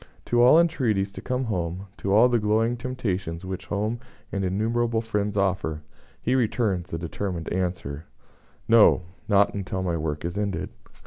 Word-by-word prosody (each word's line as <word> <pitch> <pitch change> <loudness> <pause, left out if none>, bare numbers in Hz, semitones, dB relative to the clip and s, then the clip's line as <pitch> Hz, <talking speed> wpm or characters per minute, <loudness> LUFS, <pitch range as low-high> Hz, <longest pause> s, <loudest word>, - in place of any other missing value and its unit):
To 120 0 +2
all 125 +7 +7
entreaties 115 -13 +1
to - - -8
come 130 0 -1
home, 90 -4 -3
to 95 - -2
all 110 +5 +7
the 120 -1 +2
glowing 110 +3 +2
temptations 100 -9 -3
which 95 -1 -6
home 105 +3 -1 0.3
and 100 - -2
innumerable 115 +5 0
friends 105 -2 -2
offer, 95 -6 0 0.4
he 125 - +1
returns 110 -7 0
the 80 - -3
determined 85 0 -4
answer: 90 -5 -3 0.6
"No; 110 -5 +6 0.2
not 100 -1 +4
until 95 -1 -3
my 85 -2 0
work 75 0 -3
is 90 +4 -3
ended." 100 -5 -2
100 Hz, 155 wpm, -25 LUFS, 90-115 Hz, 0.6 s, all